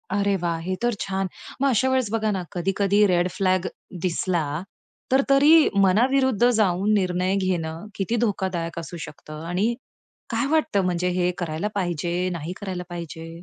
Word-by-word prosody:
अरे 200 0 +2
वाह! 170 -1 -1
हे 185 - -1
तर 240 0 +2
छान. 195 0 -2 0.3
मग 275 - +4
अशावेळेस 260 -1 +2
बघा 220 -1 0
ना, 190 -2 -2
कधी-कधी 195 +3 +2
रेड 175 -1 +2
फ्लॅग 185 -1 +2 0.4
दिसला, 175 -1 0 0.7
तर 265 +1 +5
तरी 275 +3 +6 0.4
मनाविरुद्ध 245 +3 +3
जाऊन 210 -3 +2
निर्णय 185 -1 +1
घेणं 175 -2 -2
किती 195 +4 -1
धोकादायक 180 -5 -2
असू 170 +1 -7
शकतं 155 +1 -10
आणि 200 +7 +1 0.6
काय 230 +2 0
वाटतं, 310 -10 +2
म्हणजे 180 0 0
हे 180 0 +2
करायला 170 +3 -2
पाहिजे, 175 -1 -1
नाही 170 +1 -5
करायला 185 -3 -4
पाहिजे? 165 -2 -7
185 Hz, 150 wpm, -24 LUFS, 175-215 Hz, 0.7 s, तरी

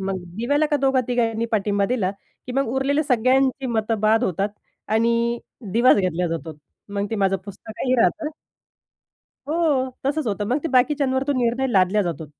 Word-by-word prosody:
मग 190 0 -2 0.2
दिव्याला 285 +7 +1
का 295 -1 +1
दोघा 270 -1 +2
तिघांनी 230 -2 0
पाठिंबा 205 -1 +1
दिला 215 -6 0 0.4
की 250 - -5
मग 275 +2 +1
उरलेले 280 +3 +1
सगळ्यांची 260 +1 +2
मतं 225 -2 -1
बाद 220 +3 +3
होतात. 195 +1 0 0.4
आणि 235 +2 +1 0.3
दिवाच 240 +3 +5
घेतल्या 180 -3 0
जातो. 165 -2 -5 0.3
मग 200 0 -2
ते - - -1
माझं 195 -1 +2
पुस्तकही 220 +5 -4
राहतं 315 +3 +1 1.2
हो. 300 -5 +1 0.2
तसंच 290 0 0
होतं. 205 0 -1
मग 255 - +1
ते 330 - -2
बाकीच्यांवर 265 0 +2
तो 285 - +2
निर्णय 240 +3 +1
लादल्या 195 +2 +3
जातो. 165 -4 -4
235 Hz, 160 wpm, -22 LUFS, 205-265 Hz, 1.2 s, दिवाच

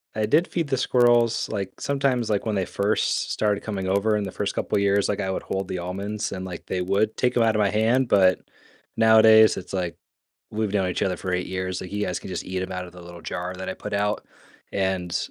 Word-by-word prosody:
I 110 0 +1
did 155 +11 +3
feed 165 -3 -2
the 135 - +1
squirrels, 120 -2 +3
like, 100 -3 -5
sometimes, 135 -4 0
like, 105 +1 0
when 110 -2 -1
they 95 -2 0
first 100 +4 0
started 105 -1 0
coming 95 -3 -3
over 100 +3 +2
in 105 - -1
the 95 - -5
first 100 +1 -3
couple - - 0
years, 100 0 +2
like, 105 - -1
I 95 - -2
would 95 - -3
hold 95 -1 -3
the - - -3
almonds, 100 +4 -4
and, 95 0 -5
like, 90 -2 -7
they 90 - -2
would 100 +4 +1
take 125 - +1
them 120 - +4
out 110 -1 +2
of - - +1
my 100 -1 +3
hand, 115 +5 +2
but 95 -4 +4 0.6
nowadays 110 -1 +7
it's - - -8
like 90 -3 -2 0.5
we've 110 -2 -2
known 95 -2 +1
each 90 - -2
other 95 -2 0
for 95 +1 -4
8 90 0 -1
years, 95 0 -3
like, 90 - -8
you 105 0 -1
guys 90 - -2
can - - -10
just 90 - -4
eat 95 0 -4
them 95 - -4
out 90 0 -4
of 90 - -13
the 90 - -12
little 85 -1 -11
jar 90 +1 -4
that 95 0 -6
I - - -4
put - - -8
out, 105 +1 -1 0.5
and, 95 -3 -1
100 Hz, 245 wpm, -24 LUFS, 95-110 Hz, 0.6 s, nowadays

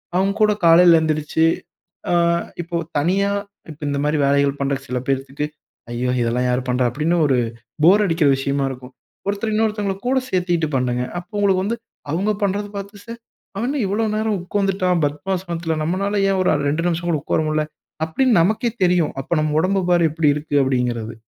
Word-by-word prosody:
அவங்க 195 +2 +2
கூட 210 0 +5
காலைல 170 0 +7
எந்திருச்சு, 155 0 +1 0.7
ஆ - - +2 0.5
இப்போ 170 0 -3 0.2
தனியா 195 +6 +1 0.4
இப்ப 150 - -14
இந்த 140 0 -1
மாரி 150 +1 +1
வேலைகள் 140 0 +2
பண்ற 140 0 +1
சில 125 +1 -2
பேத்துக்கு. 135 +1 -2 0.5
ஐயோ! 125 +1 -1
இதெல்லாம் 120 +2 0
யார் 125 +1 +1
பண்றா? 125 0 +1
அப்படின்னு 155 +7 0
ஒரு 135 -3 +3 0.5
போர் 195 +6 +6
அடிக்கிற 165 -4 +2
விஷயமா 140 +1 -1
இருக்கும். 130 0 -9 0.3
ஒருத்தர் 205 +2 -1
இன்னொருத்தவங்கள 210 -2 0
கூட 265 +1 +2
சேர்த்துக்கிட்டு 175 -5 0
பண்ணுங்க. 125 -1 0 0.2
அப்போ 180 +5 -15
உங்களுக்கு 190 -2 +2
வந்து 230 +3 -1 0.3
அவங்க 190 +7 0
பண்றத 200 +1 0
பாத்து 200 +1 -8
ச - - -37 0.5
அவன் 230 +4 -1
என்ன 285 +1 -1
இவ்வளவு 210 +2 0
நேரம் 215 -1 0
உட்கார்ந்துட்டான் 185 -2 0
பத்மாசனத்துல! 170 +2 -2
நம்மலால 195 +5 -1
ஏன் 195 -1 +1
ஒரு 185 - +2 0.2
2 155 +3 -1
நிமிஷம் 175 0 -2
கூட 165 - +2
உட்கார - - 0
முடில? 155 0 +1 0.4
அப்படின்னு 250 +10 +1
நமக்கே 220 +7 +1
தெரியும். 175 -3 +2
அப்ப 135 - -3
நம்ம 155 0 0
உடம்ப 190 +3 +1
பாரு 175 -2 +4
எப்டி 155 0 0
இருக்கு 150 0 -4
அப்படிங்கறது. 120 -4 -1
170 Hz, 170 wpm, -20 LUFS, 145-195 Hz, 0.7 s, காலைல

